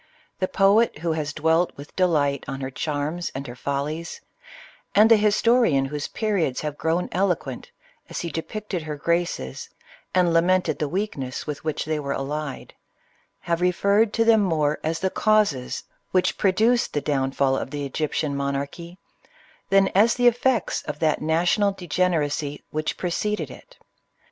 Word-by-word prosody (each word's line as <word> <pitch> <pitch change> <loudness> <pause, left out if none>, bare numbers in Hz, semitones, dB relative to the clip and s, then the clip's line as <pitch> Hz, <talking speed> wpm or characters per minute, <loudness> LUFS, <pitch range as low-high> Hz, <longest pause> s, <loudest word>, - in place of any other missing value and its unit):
The 185 - +1
poet 200 +3 +3
who 165 - +2
has 155 -2 -2
dwelt 160 +3 +1
with 140 +2 -11
delight 150 -7 +2
on 135 -1 -4
her 135 0 -4
charms 150 +5 -3
and 135 +1 -4
her 120 -2 -8
follies, 145 +5 -3 0.8
and 215 +2 +6
the - - +10
historian 215 - +3
whose 145 +1 -4
periods 200 - -1
have 150 -1 -3
grown 165 +2 0
eloquent 190 - -1 0.4
as - - -4
he 170 - -4
depicted 190 +3 -4
her 155 -1 -5
graces 170 - -2 0.5
and 180 -2 +3
lamented 175 -1 +2
the 150 - -1
weakness 155 -9 -3
with 150 -2 -5
which 155 -1 -2
they 155 0 -1
were 140 -1 -2
allied, 145 0 -4 0.7
have 170 0 -1
referred 200 +4 +3
to 230 - +2
them, 225 -2 +5
more 155 -6 +1
as 160 +1 -1
the 190 - 0
causes 210 -13 +1 0.3
which 185 0 +1
produced 220 +5 +2
the 145 - 0
downfall 135 -1 +1
of 135 - -3
the 145 0 -4
Egyptian 150 +1 -2
monarchy, 140 +5 -4 0.7
than 195 0 +5
as 215 +5 +4
the 245 - +1
effects 245 -2 +2
of - - -6
that 155 -2 +1
na 160 +2 +1
tional 200 +2 +2
degeneracy 155 -4 -1
which 155 0 -2
preceded 210 +4 -2
it. - - -15
165 Hz, 155 wpm, -24 LUFS, 145-195 Hz, 0.8 s, the